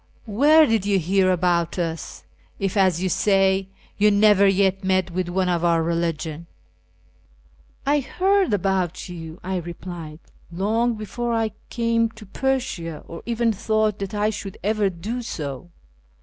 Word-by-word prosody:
Where 290 Hz, +9 st, +5 dB
did 225 Hz, -7 st, +1 dB
you 200 Hz, -1 st, +3 dB
hear 185 Hz, +2 st, +2 dB
about 175 Hz, -1 st, +1 dB
us, 165 Hz, -2 st, -4 dB, 0.3 s
if, 195 Hz, 0 st, -2 dB
as 185 Hz, -3 st, +2 dB
you -, -, +1 dB
say, 195 Hz, 0 st, +2 dB, 0.3 s
you 210 Hz, +1 st, +6 dB
never 205 Hz, -1 st, +5 dB
yet 195 Hz, 0 st, +2 dB
met 185 Hz, -1 st, +1 dB
with 180 Hz, 0 st, -2 dB
one 185 Hz, +1 st, 0 dB
of 175 Hz, -1 st, 0 dB
our 170 Hz, -1 st, +3 dB
religion? 165 Hz, -1 st, -2 dB, 0.4 s
" -, -, -35 dB
" -, -, -33 dB
I 290 Hz, +1 st, +3 dB
heard 380 Hz, -, +1 dB
about 190 Hz, -3 st, 0 dB
you," 165 Hz, -2 st, -8 dB
1 185 Hz, -1 st, -2 dB
replied, 170 Hz, -2 st, -8 dB, 0.3 s
" -, -, -28 dB
long 225 Hz, +7 st, 0 dB
before 235 Hz, +2 st, -3 dB
I 225 Hz, -1 st, 0 dB, 0.2 s
came 230 Hz, -1 st, +1 dB
to 220 Hz, -, -11 dB
Persia, 195 Hz, -, -2 dB
or 165 Hz, -, -8 dB
even 230 Hz, -1 st, +1 dB
thought 215 Hz, 0 st, 0 dB
that 195 Hz, +1 st, -4 dB
I 210 Hz, +1 st, +1 dB
should 200 Hz, -2 st, -7 dB
ever 210 Hz, 0 st, +1 dB
do 205 Hz, +8 st, -5 dB
so. 150 Hz, -, -6 dB
195 Hz, 160 wpm, -23 LUFS, 175-220 Hz, 0.4 s, you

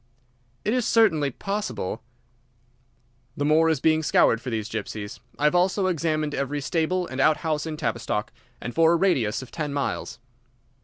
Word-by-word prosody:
"It 215 Hz, -, +1 dB
is 250 Hz, -3 st, +1 dB
certainly 160 Hz, -11 st, +3 dB
possible." 135 Hz, -, -4 dB, 1.4 s
"The 145 Hz, -, 0 dB
moor 160 Hz, +2 st, +4 dB
is 160 Hz, -4 st, +1 dB
being 160 Hz, +2 st, +3 dB
scoured 115 Hz, -6 st, +3 dB
for 125 Hz, -, -5 dB
these 110 Hz, -3 st, -2 dB
gypsies. 105 Hz, -2 st, -5 dB, 0.2 s
I -, -, -5 dB
have 150 Hz, -, +4 dB
also 185 Hz, +2 st, +2 dB
examined 155 Hz, -4 st, 0 dB
every 140 Hz, +2 st, -2 dB
stable 170 Hz, +5 st, 0 dB
and 130 Hz, -3 st, -3 dB
out 155 Hz, +2 st, +4 dB
house 155 Hz, 0 st, -1 dB
in 155 Hz, -1 st, -4 dB
Tavistock, -, -, -2 dB, 0.3 s
and 120 Hz, -, -6 dB
for 165 Hz, 0 st, +4 dB
a -, -, +4 dB
radius 135 Hz, -, +1 dB
of 130 Hz, -, -13 dB
ten 150 Hz, -3 st, -3 dB
miles." 140 Hz, -4 st, -3 dB
155 Hz, 165 wpm, -25 LUFS, 130-170 Hz, 1.4 s, moor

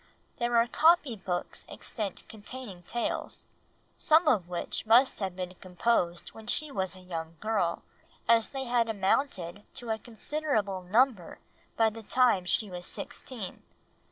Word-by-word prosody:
There 240 Hz, 0 st, +2 dB
are 230 Hz, -, +6 dB
copy 305 Hz, -1 st, +4 dB
books 180 Hz, -3 st, -3 dB
extant 210 Hz, -5 st, -5 dB
containing 215 Hz, -3 st, -9 dB
tales, 235 Hz, +7 st, -3 dB, 0.5 s
some 315 Hz, +1 st, +4 dB
of 210 Hz, -, +3 dB
which 180 Hz, +4 st, -3 dB
must 245 Hz, +4 st, +5 dB
have 190 Hz, -3 st, -2 dB
been 180 Hz, -1 st, -4 dB
composed 180 Hz, -1 st, 0 dB
while 220 Hz, 0 st, -13 dB
she 300 Hz, +4 st, +1 dB
was 190 Hz, -5 st, -1 dB
a 185 Hz, -, -12 dB
young 165 Hz, -2 st, -6 dB
girl, 200 Hz, -6 st, 0 dB, 0.4 s
as 230 Hz, -1 st, +5 dB
they 270 Hz, -1 st, -4 dB
had 240 Hz, -2 st, +1 dB
amounted 195 Hz, -3 st, 0 dB
to 240 Hz, -4 st, -4 dB
a 220 Hz, -, -1 dB
considerable 225 Hz, -5 st, -2 dB
number 210 Hz, -1 st, +2 dB, 0.4 s
by 225 Hz, -1 st, +4 dB
the 225 Hz, +1 st, -9 dB
time 225 Hz, -4 st, +3 dB
she 210 Hz, +4 st, +1 dB
was 180 Hz, -2 st, -7 dB
sixteen. 225 Hz, -8 st, -5 dB
220 Hz, 145 wpm, -29 LUFS, 185-240 Hz, 0.5 s, are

